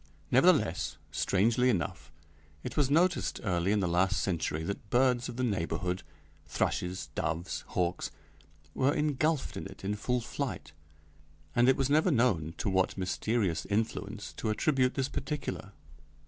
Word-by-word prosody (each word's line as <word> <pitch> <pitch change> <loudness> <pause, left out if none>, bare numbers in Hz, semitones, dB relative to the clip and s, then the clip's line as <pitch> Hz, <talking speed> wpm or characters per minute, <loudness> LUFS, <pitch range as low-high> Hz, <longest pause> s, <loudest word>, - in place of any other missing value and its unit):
Nevertheless, - - +3
strangely 115 +6 +2
enough, 90 -7 -2 0.5
it - - -5
was 145 -3 +2
noticed 175 +5 +2
early 90 -2 +1
in 105 -1 +2
the 90 - +1
last 90 +3 +2
century 80 -4 -1
that 100 +4 -5
birds 125 -1 +2
of - - -6
the 125 - -2
neighborhood 90 -3 -1 0.5
thrushes, 90 +1 -1
doves, 85 +3 -2
hawks 90 0 -1 0.6
were 135 +2 +2
engulfed 150 0 0
in - - -5
it - - -13
in 100 - 0
full 125 +4 0
flight, 125 - -4 0.8
and 120 +2 +5
it 130 - +4
was 135 - +1
never 155 +5 +3
known 95 - +2
to - - -3
what 95 -1 +1
mysterious 95 0 -1
influence 105 0 -2
to 110 - -2
attribute 130 +3 +2
this 135 -2 0
particular. 145 +2 -4
110 Hz, 145 wpm, -30 LUFS, 95-130 Hz, 0.8 s, and